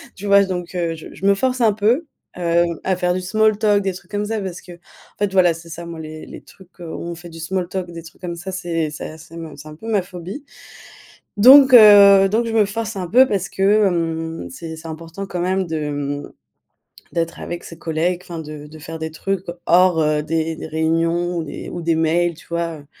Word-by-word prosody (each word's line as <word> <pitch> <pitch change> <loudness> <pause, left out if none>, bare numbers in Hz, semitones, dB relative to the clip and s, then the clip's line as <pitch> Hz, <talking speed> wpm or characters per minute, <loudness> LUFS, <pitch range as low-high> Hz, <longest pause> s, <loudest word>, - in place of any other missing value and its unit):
tu 200 - -9
vois? 200 0 +6
J - - -4
donc, 180 -1 -4
heu, 170 -2 -1
je 160 - -10
je 195 - -7
me 200 - +6
force 255 +2 -1
un 220 -2 +5
peu, 230 +10 +1 0.3
heu, 170 0 +2 0.2
à 190 - +1
faire 180 0 +1
du 185 - -2
small 215 +3 +2
talk 210 -2 +3
des 190 -1 -2
trucs 185 - -13
comme 205 0 -1
ça 220 +1 -2
parce 185 -2 -5
que, 175 - -12
en - - -14 0.4
fait 205 -1 0
voilà, 180 -3 +4
c'est 165 +1 -12
ça 170 +1 -7
moi 165 -1 -8
les 155 0 -8
les - - -11
trucs, 185 -1 -20
où - - -9
on 170 +1 -6
fait 175 +1 -11
du 165 - -11
small 180 +2 -3
talk 185 -2 -4
des 165 -1 -9
trucs 160 +3 -15
comme 175 -1 -4
ça. 175 +3 -7
C'est 170 -4 -2
c'est 155 - -7
a 160 - -12
c'est 165 +1 -13
ma 160 -2 -8
c'est 155 - -11
un 150 - -10
peu 220 +9 -9
ma 210 -3 +2
phobie. 180 - -8 0.9
Donc, 265 +4 +8
heu 200 -3 +9
donc 230 +2 +1
je 230 - -3
me 215 - +5
force 220 +1 -4
un 180 -2 -3
peu 255 +8 +6
parce 195 -1 -2
que 190 - -4 0.2
hem, 165 - -2
c'est 160 - -8
c'est 160 +1 -10
important 165 +4 -7
quand 180 -2 -4
même 185 +1 0
de 160 -1 -3
hem, 145 -1 -4 0.8
d'être 165 -1 -2
avec 175 0 -6
ses 165 - -11
collègues. 170 +2 -1
Enfin 175 -2 -7
de 150 -1 -9
de 155 +1 -13
faire 160 +1 -8
des 160 0 -4
trucs 195 +3 -3 0.2
hors, 180 -1 +4
heu, 150 0 +1
des 160 0 -2
des - - -7
réunions 165 +2 0
ou 165 - -2
des - - -8
ou 175 - -6
des 165 0 +1
mails 165 +2 +1
tu 165 - -17
vois? 170 -1 -3
Heu, 145 - -18
175 Hz, 245 wpm, -20 LUFS, 165-195 Hz, 0.9 s, heu